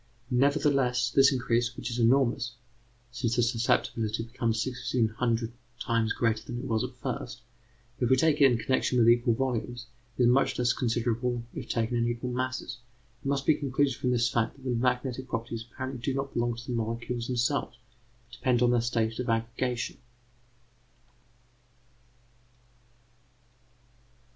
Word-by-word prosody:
Nevertheless, 130 -3 +2
this 135 0 +6
increase, 120 -2 0
which 120 - -4
is 120 - -3
enormous 120 -1 +2 0.6
(since 120 -1 -1
the 120 - +3
susceptibility 115 -2 0
becomes 115 -1 -2
sixteen 125 -1 0
hundred 115 +1 -1 0.3
times 115 -1 0
greater 115 -2 0
than 120 - -6
it 120 - -5
was 110 -4 0
at - - -5
first), - - -5 0.6
if 120 - +1
we 130 - +6
take 150 +2 +2
it 135 -2 +7
in 120 - +2
connection 130 +1 0
with 115 -1 +5
equal 120 -1 +4
volumes, 120 -1 -2 0.3
is 125 - +4
much 125 +3 +3
less 125 0 +2
considerable 120 0 -1
if - - -7
taken 115 +1 0
in 120 0 +1
equal 120 +1 -3
masses. 130 -1 -3 0.4
It - - -4
must 140 0 0
be 155 - +5
concluded 140 -1 0
from 125 - -1
this 120 -1 +2
fact 115 -1 0
that 135 - -18
the 130 - -1
magnetic 125 +1 -1
properties 115 -1 -4
apparently 130 -1 -5
do 130 +2 -1
not 135 0 -3
belong 120 0 0
to 120 +1 -9
the 125 - -4
molecules 115 +1 -3
themselves, 125 0 -1 0.5
but 120 - -33
depend 125 -1 +2
on 120 - +4
their 120 -1 +3
state 115 -1 -1
of 125 -1 -2
aggregation. 115 +2 -1
120 Hz, 155 wpm, -28 LUFS, 115-130 Hz, 0.6 s, it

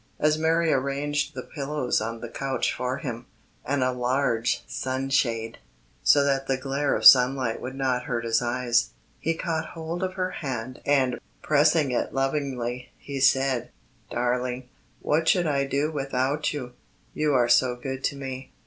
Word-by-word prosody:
As 150 0 +3
Mary 160 +1 +2
arranged 145 +2 -1
the - - -5
pillows 140 -5 -2
on 115 +1 -4
the 120 - -5
couch 135 +3 -2
for 125 +1 -2
him, 125 -6 -6 0.4
and 135 0 0
a 130 - +2
large 125 -1 0
sunshade, 130 -4 -1 0.4
so 145 - +5
that 135 -1 0
the 135 - +1
glare 140 +2 -1
of - - -2
sunlight 125 -2 +6
would 130 +1 -6
not 130 -2 -1
hurt 120 -5 -2
his 115 0 +2
eyes, 120 - 0 0.3
he 165 +1 -1
caught 160 -1 -3
hold 165 +1 -4
of 185 0 -2
her 185 -1 -1
hand 130 -3 -5
and, 135 -3 +2 0.2
pressing 150 -1 +3
it 125 - -2
lovingly, 135 -3 -2
he 140 -1 -6
said: 135 -1 +2 0.4
"Darling, 125 +1 -2 0.3
what 160 +2 +1
should 180 -2 +4
I 140 -3 +1
do 140 +3 0
without 140 0 -1
you? 130 -5 -5 0.4
You 150 -2 +1
are 120 -2 +4
so 120 +1 +4
good 130 +1 -6
to - - 0
me." 135 -1 -7
135 Hz, 160 wpm, -26 LUFS, 125-145 Hz, 0.4 s, sunlight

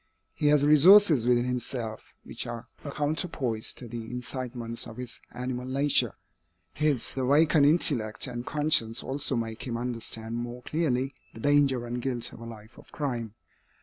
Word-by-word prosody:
He 150 - -1
has 145 -1 +4
resources 155 - +7
within 120 0 +3
himself, 120 -3 -4
which - - -3
are 120 0 -7 0.2
a 140 - -6
counterpoise 145 -6 -2
to 125 - -9
the 115 -1 -7
incitements 125 -1 -4
of 115 - -11
his 125 -2 -7
animal 125 0 -5
nature. 140 +2 +2 0.6
His 150 -5 0
awakened 145 +3 +4
intellect 130 -9 +2
and 120 -2 -5
conscience 145 -6 +1
also 135 0 -1
make 115 -1 -4
him 115 -2 -3
understand 115 -1 -2
more 120 +1 -6
clearly 135 -4 -1 0.2
the - - -9
danger 140 -2 +2
and 120 +1 -4
guilt 125 -2 -1
of - - -12
a 115 - -9
life 110 -2 -12
of - - -18
crime. 120 -7 -4
125 Hz, 155 wpm, -27 LUFS, 115-145 Hz, 0.6 s, resources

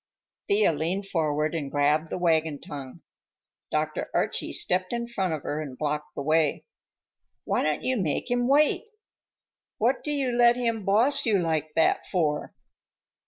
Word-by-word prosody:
Thea 200 -4 +3
leaned 170 +6 -2
forward 155 -4 -1
and 150 -4 -3
grabbed 150 +3 +1
the - - -3
wagon 160 -4 +1
tongue. 135 -3 -9 0.7
Dr. 155 0 -2
Archie - - -1
stepped 185 +2 +1
in 235 0 -2
front 190 -7 -2
of 155 -3 -3
her 150 +1 -3
and 135 -4 -7
blocked 150 0 -3
the 140 - -4
way. 155 0 +1 0.8
"Why - - 0
don't - - -1
you 260 -1 0
make 165 - -2
him 245 0 +1
wait? 295 - +3 0.9
What 245 +4 +1
do 295 - -3
you 275 -3 0
let 240 0 +5
him 230 -4 -2
boss 245 +7 +4
you 210 -3 +4
like 160 -3 -1
that 160 - +2
for?" 155 -5 -1
165 Hz, 160 wpm, -26 LUFS, 150-235 Hz, 0.9 s, let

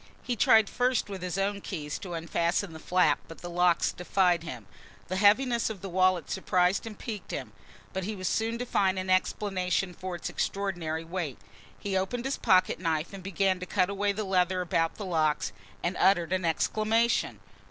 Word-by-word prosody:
He 245 - -1
tried 220 -1 +5
first 245 -2 0
with 195 -2 -6
his 180 0 -3
own 200 +1 -1
keys 150 -7 -5
to 180 -3 -6
unfasten 170 +2 -1
the 160 - -9
flap 170 -4 +2
but 165 - -11
the 175 - -6
locks 175 -1 +3
defied 180 -1 +1
him. 130 -10 -7 0.4
The 185 - -1
heaviness 235 +4 +4
of 215 -4 -7
the 195 - -5
wallet 185 -2 +2
surprised 185 +2 +1
and 215 -2 -8
piqued 215 -4 -6
him, - - -5 0.4
but 190 - -2
he 210 +3 -3
was 185 -2 -3
soon 225 +1 0
to 245 - -3
find 190 -5 +1
an 185 0 -2
explanation 185 -1 0
for 185 +1 -5
its 175 - -5
extraordinary 175 -5 -2
weight. 165 -5 -4 0.4
He 200 -2 -3
opened 215 +7 -1
his 270 - -1
pocket 185 -5 +3
knife 165 0 -1
and 195 - -7
began 190 0 0
to 185 - -6
cut 185 0 +1
away 200 +1 +1
the 210 +2 -3
leather 185 -1 +1
about 165 -2 0
the 205 - -6
locks, 155 -4 +1 0.3
and 175 +2 -1
uttered 180 -2 +3
an 185 -1 0
exclamation. 215 - +1
185 Hz, 190 wpm, -28 LUFS, 175-200 Hz, 0.4 s, tried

